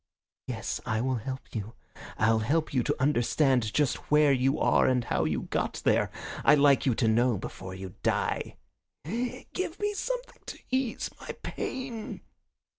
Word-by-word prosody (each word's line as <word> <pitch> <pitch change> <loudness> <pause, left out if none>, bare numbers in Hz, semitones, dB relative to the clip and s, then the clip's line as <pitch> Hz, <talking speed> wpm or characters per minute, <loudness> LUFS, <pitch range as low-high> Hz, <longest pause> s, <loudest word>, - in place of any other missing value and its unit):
"Yes, 115 -3 -3
I 110 -1 -1
will 130 +1 0
help 130 +4 -6
you. 110 0 -5 0.4
I'll 110 0 +3
help 150 +9 0
you 130 - +3
to - - -1
understand 130 -3 +2
just 145 0 0
where 150 -1 +5
you 135 +2 +2
are - - +4
and 125 -2 +2
how 80 - 0
you 75 -4 -1
got - - -2
there. - - +3 0.3
I'd 150 - +6
like 140 -1 +5
you 125 - +3
to 115 - +1
know 120 +1 +3
before 95 0 -7
you 95 -1 -7
die." - - -1 0.5
"Give 250 - -4
me 415 0 0
something - - -4
to - - -6
ease 260 -2 -1
my - - -6
pain." 250 -4 -5
130 Hz, 160 wpm, -29 LUFS, 110-160 Hz, 0.5 s, I'd